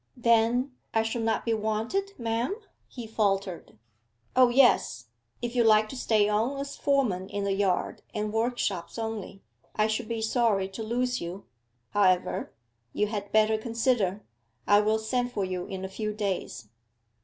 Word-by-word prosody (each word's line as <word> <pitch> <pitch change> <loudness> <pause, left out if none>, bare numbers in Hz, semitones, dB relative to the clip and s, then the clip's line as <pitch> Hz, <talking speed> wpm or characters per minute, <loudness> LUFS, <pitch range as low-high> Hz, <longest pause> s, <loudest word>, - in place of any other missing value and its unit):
'Then 235 +2 +3 0.2
I 225 - +4
shall 225 +1 -2
not 225 -1 0
be 230 - +1
wanted, 225 - -2
ma'am?' 230 - -1 0.3
he 240 -3 -8
faltered. 195 - -1 0.6
'O 255 -1 +6
yes; 240 - +3 0.4
if 240 +1 -3
you 240 - +4
like 215 -1 +5
to - - -7
stay 215 -4 +2
on 225 +6 0
as 280 0 -5
foreman 225 -10 0
in 200 0 -3
the 200 0 0
yard 195 -2 0
and 210 -1 -3
workshops 225 -6 -1
only. 220 -3 -5 0.3
I 215 - +3
should 220 +1 -1
be 230 0 -3
sorry 220 -4 +1
to 195 +4 -7
lose 245 +3 -1
you. 175 +3 -6 0.5
However, 185 -3 +2 0.4
you 210 - +1
had 205 -2 -4
better 220 0 +3
consider. 225 -4 0 0.4
I 205 0 +6
will 215 +1 +2
send 245 +3 -1
for 200 -2 -1
you 180 -1 -4
in 190 -2 -5
a - - -3
few 210 +2 -4
days. 190 - -3
220 Hz, 160 wpm, -28 LUFS, 200-235 Hz, 0.6 s, O